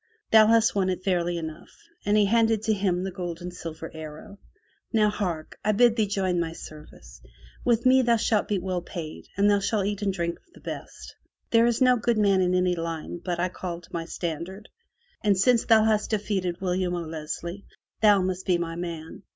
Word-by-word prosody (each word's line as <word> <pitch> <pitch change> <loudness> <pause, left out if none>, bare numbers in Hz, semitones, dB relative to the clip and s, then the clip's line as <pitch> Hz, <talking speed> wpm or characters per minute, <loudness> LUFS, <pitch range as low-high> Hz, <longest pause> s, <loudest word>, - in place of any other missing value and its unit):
Thou 220 -1 +8
hast 225 0 +4
won 190 -2 +1
it 185 0 -3
fairly 175 -2 0
enough," 160 0 -7 0.4
and 205 +1 +4
he 210 - +5
handed 225 0 +2
to 220 - +2
him 190 -3 0
the 190 - -3
gold 175 -2 -5
and 180 0 -7
silver 165 -2 -7
arrow. 160 +5 -9 0.5
"Now 215 -2 +3
hark! 175 -7 -4
I 215 - +2
bid 235 +2 +4
thee 220 -3 +1
join 190 -3 0
my 165 -1 -2
service. 60 - -12 0.4
With 235 0 +2
me 260 +1 +6
thou 240 -2 +3
shalt 220 -2 +1
be 205 - 0
well 185 -1 -2
paid 170 -3 -8
and 200 +1 +4
thou 205 -1 +4
shalt 200 0 0
eat 205 0 -2
and 200 -1 +1
drink 170 -2 -3
of 345 -3 -34
the - - -14
best. - - -8 0.4
There 230 0 +5
is 240 +1 0
no 250 -1 +5
good 235 0 0
man 200 -3 +3
in 180 0 +2
any 180 -1 +2
line 165 0 -5
but 175 -2 -2
I 180 +1 +1
call 175 -1 -5
to 165 - -19
my 165 -1 -3
standard, 175 +5 -5 0.5
and 205 -3 +3
since 235 +4 +3
thou 225 -2 +6
hast 215 -1 +1
defeated 195 -5 -1
William 180 -1 0
O'Leslie, 170 +3 -5 0.4
thou 205 -3 +5
must 185 0 -3
be 180 -2 +3
my 165 -1 -4
man. 170 -1 -6
185 Hz, 205 wpm, -26 LUFS, 170-215 Hz, 0.5 s, Thou